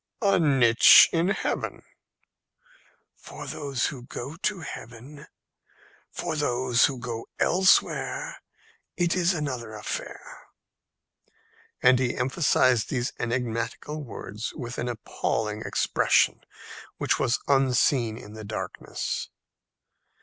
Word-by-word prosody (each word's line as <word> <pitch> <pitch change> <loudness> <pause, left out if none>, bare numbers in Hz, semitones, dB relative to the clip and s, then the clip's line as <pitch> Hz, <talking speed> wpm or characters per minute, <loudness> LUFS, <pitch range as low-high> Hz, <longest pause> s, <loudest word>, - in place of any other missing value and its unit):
"A 200 -2 +4
niche 130 -7 +7
in 170 +1 +2
heaven." 195 - -2 1.3
"For - - -10
those 140 -5 -2
who 135 -4 -4
go 130 +3 -7
to 190 +1 -2
heaven; 140 +1 -10 0.8
for 160 - -4
those 125 -4 +2
who 135 - -2
go 115 -1 -6
elsewhere 185 +2 +2 0.6
it 175 0 +1
is 180 -1 +2
another 125 -8 -4
affair." 105 - -7 1.4
And 125 0 +6
he 125 -2 -1
emphasized 130 -3 +2
these 125 -2 -2
enigmatical 120 +5 -3
words 110 -3 -6
with 125 -5 -6
an 120 - -2
appalling 110 -2 -3
expression - - +2 0.6
which - - 0
was 120 - +1
unseen 130 -4 +2
in 105 -3 -11
the 110 0 -9
darkness. 105 +1 -5
125 Hz, 105 wpm, -26 LUFS, 115-150 Hz, 1.4 s, niche